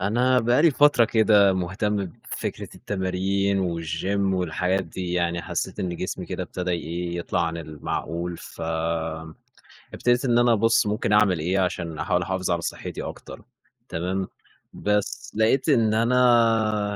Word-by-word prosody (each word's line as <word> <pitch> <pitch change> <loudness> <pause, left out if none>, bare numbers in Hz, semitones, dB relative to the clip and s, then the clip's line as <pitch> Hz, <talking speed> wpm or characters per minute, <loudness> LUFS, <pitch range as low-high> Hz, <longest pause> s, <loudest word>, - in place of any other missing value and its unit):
أنا 120 +6 +2
بقى 120 +5 +3
لي 165 - +6
فترة 145 -3 +5
كده 110 -3 +4
مهتم 95 +3 -1 0.4
بفكرة - - -4
التمارين 95 +1 -1 0.2
والGYM 80 +5 -2 0.2
والحاجات 90 +2 0
دي، 90 +2 -5
يعني 85 -1 0
حسّيت - - -4
إن 90 -2 -3
جسمي 95 - -4
كده - - -4
ابتدى 90 0 -4
إيه 85 0 -3
يطلع 85 0 -1
عن 85 0 -3
المعقول، 85 +2 -4
ف - - -12 1.3
ابتديت 125 +2 +1
إن 120 -2 +3
أنا 120 0 +4
أبص 115 +1 +3
ممكن 105 0 0
أعمل 105 -5 +4
إيه، 90 +5 0
عشان 85 -4 -2
أحاول 90 +2 +1
أحافظ 95 0 -2
على 85 -1 0
صحتي - - -5
أكتر، - - -9 0.5
تمام؟ 95 +3 -2 0.5
بس 105 0 -2
لقيت 115 +7 +2
إن 115 -6 +3
أنا 115 -3 +3
95 Hz, 140 wpm, -24 LUFS, 90-115 Hz, 1.3 s, لي